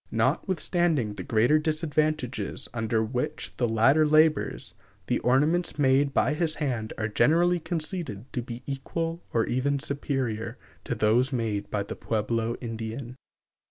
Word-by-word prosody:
Notwithstanding 170 - +1
the - - -7
greater 120 +7 +3
disadvantages 155 -4 -1
under 110 -1 0
which 125 +3 -3
the 120 -2 +1
latter 115 +8 +4
labors, 155 0 +2 0.3
the - - 0
ornaments 150 +8 +2
made 140 0 +3
by 135 +1 +2
his 155 0 0
hand 120 -7 -2
are 105 - -1
generally 170 +10 +3
conceded 160 - -3
to 125 - -1
be 120 0 -8
equal 165 +5 -3
or 115 -1 +2
even 135 +3 0
superior 130 -5 -3 0.3
to 125 - -2
those 115 +5 +3
made 110 -5 -2
by 100 -1 -1
the - - -6
Pueblo 115 +1 -1
Indian. 115 +2 -5
130 Hz, 135 wpm, -27 LUFS, 115-155 Hz, 0.3 s, latter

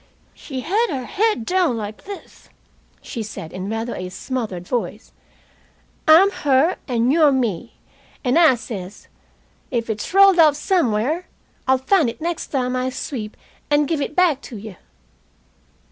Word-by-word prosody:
"She 265 -3 -7
had 420 - +1
her 260 -4 -3
head 420 - 0
down 360 -8 +1
like 210 -1 -7
this," 400 0 -11 0.5
she 235 - -5
said, 205 -6 -7
in 185 +2 -5
rather 225 +2 -3
a 185 0 -5
smothered 195 -4 -5
voice. 245 -2 -3 1.0
"I'm 345 +6 +7
her, 295 -1 +2
and 245 0 +1
you're 310 -3 +5
me. 235 -10 -2 0.5
And 255 +4 +3
I 315 -6 +6
says: 205 -5 -8 0.6
'If 230 -3 -1
it's 210 -1 -5
rolled 390 -1 +6
off 305 -3 +6
somewhere 300 - 0 0.4
I'll 260 0 +4
find 285 +1 +2
it 230 - -8
next 335 +1 -3
time 255 -2 -1
I 255 0 -1
sweep, 235 -4 -6 0.3
and 290 0 +3
give 315 -2 -1
it 295 - -3
back 340 -7 +3
to 240 - -9
you.' 205 -1 -9
260 Hz, 150 wpm, -21 LUFS, 225-330 Hz, 1.0 s, I'm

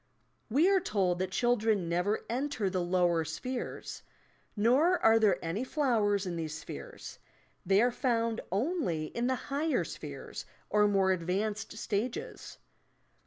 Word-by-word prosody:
We 290 +10 +4
are 390 -1 +5
told 190 - 0
that 185 0 -1
children 220 -3 +1
never 180 +5 0
enter 245 -5 -1
the 185 -1 0
lower 175 -2 +2
spheres; 245 - -5 0.5
nor 265 - +4
are 225 -5 +5
there 205 -5 +4
any 180 +9 -2
flowers 225 - +1
in 175 -2 -3
these 155 -2 -4
spheres, - - -9 0.5
they 195 +3 +5
are 245 - +3
found 230 -3 0
only 200 - 0
in 235 +1 -1
the 260 - +1
higher 290 +5 -1
spheres - - -8 0.2
or 210 0 +4
more 195 -2 +3
advanced 200 +5 -2
stages. 225 +3 -4
215 Hz, 135 wpm, -31 LUFS, 185-250 Hz, 0.5 s, are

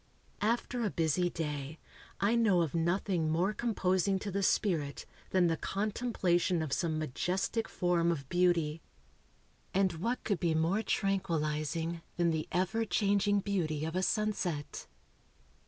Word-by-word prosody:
After 235 +2 0
a 210 - +1
busy 170 +1 +1
day, 150 -2 -4 0.4
I 200 +3 +2
know 210 -7 +4
of 155 - -3
nothing 170 0 0
more 175 +6 +1
composing 195 -4 +1
to 200 +1 -5
the 200 +2 -1
spirit 165 -8 0 0.2
than 185 -2 +3
the 165 -1 +2
contemplation 190 -5 0
of 150 - -3
some 160 -3 0
majestic 180 - -1
form 175 -1 +1
of 140 -5 -4
beauty. 170 -2 +1 0.9
And 190 -2 +3
what 230 +10 -2
could 200 -5 0
be 165 -2 +1
more 165 +7 +2
tranquillizing 165 -5 -1 0.2
than 170 -1 +3
the 160 -1 -2
ever 185 +6 +1
changing 205 -1 +2
beauty 160 -7 -1
of 160 +2 -4
a 185 - +1
sunset? 190 -8 -1
175 Hz, 140 wpm, -32 LUFS, 160-200 Hz, 0.9 s, know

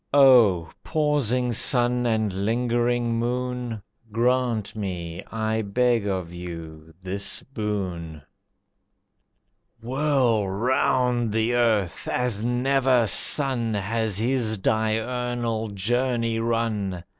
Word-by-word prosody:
O 115 - +5
Pausing 135 -6 0
Sun 125 0 +3
and 110 -3 0
Lingering 120 +1 0
Moon! 125 -2 -3 0.3
Grant 120 -2 0
me, 90 -5 -5
I 110 0 -1
beg 115 +1 0
of 90 -3 -3
you, 80 -3 -9
this 100 +2 -2
boon. 95 - -5 1.6
Whirl 125 -4 0
round 125 +2 0
the 110 +2 0
earth 110 -7 0
as 120 -4 -2
never 125 0 +2
sun 120 - +5
Has 105 +1 -1
his 115 -1 0
diurnal 115 +2 -2
journey 115 +3 -1
run. 110 -6 -2
115 Hz, 90 wpm, -24 LUFS, 100-125 Hz, 1.6 s, O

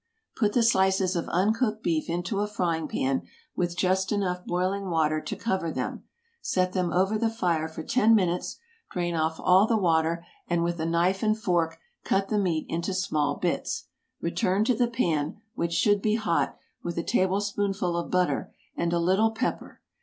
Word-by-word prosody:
Put 210 -2 +1
the 240 - +3
slices 190 -4 +3
of 170 - -2
uncooked 215 +4 +1
beef 165 -2 0
into 175 +4 -2
a 205 - 0
frying 170 -6 -1
pan 135 -1 0 0.3
with 175 -1 -1
just 190 +1 +1
enough 180 -3 -1
boiling 185 +2 -1
water 155 -2 +1
to - - -5
cover 190 -7 -1
them; - - -4 0.4
set 185 0 0
them 180 -2 0
over 195 +4 +2
the 230 - +2
fire 175 -8 0
for 160 0 -7
ten 225 +3 +4
minutes, 180 -4 0 0.3
drain 175 -1 -2
off 160 0 -1
all 185 +3 +5
the 225 - +2
water, 170 -2 +1 0.2
and 170 -1 +1
with 170 0 -1
a 160 - -1
knife 175 +3 +1
and 215 0 +2
fork 170 -6 0 0.3
cut 195 0 0
the 210 - +1
meat 170 -5 0
into 170 +3 -2
small 150 -7 0
bits. - - -2 0.3
Return 190 +3 +1
to 250 - +2
the 240 +1 +2
pan, 170 - -1
which 170 -8 -2
should 205 +2 +3
be 215 +1 +2
hot, 215 -7 0 0.2
with 170 -1 -5
a 170 - 0
tablespoonful 195 -1 0
of 170 - -2
butter 180 -1 0 0.2
and 170 0 -1
a - - +2
little 190 +6 +3
pepper. 225 - -4
185 Hz, 180 wpm, -27 LUFS, 170-205 Hz, 0.4 s, all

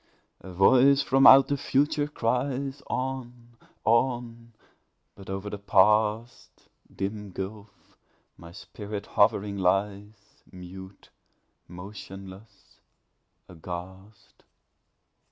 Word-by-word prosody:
A 95 - -11
voice 130 +9 +4
from 135 +1 +4
out 135 0 +8
the 140 - 0
future 145 +2 0
cries, 135 +1 -2
"On! 125 -2 -5 0.3
on!" 115 0 0 0.6
but 100 -1 -14
o'er 95 +1 -5
the 105 - -6
Past 105 +3 +1 0.2
(Dim 100 +1 -5
gulf!) 100 +2 -9 0.4
my 85 0 -13
spirit 100 +3 -8
hovering 100 -1 +1
lies 100 +2 -2
Mute, 95 +1 -12 0.6
motionless, 95 +2 -12 0.7
aghast! 95 +4 -11
105 Hz, 85 wpm, -26 LUFS, 95-125 Hz, 0.7 s, out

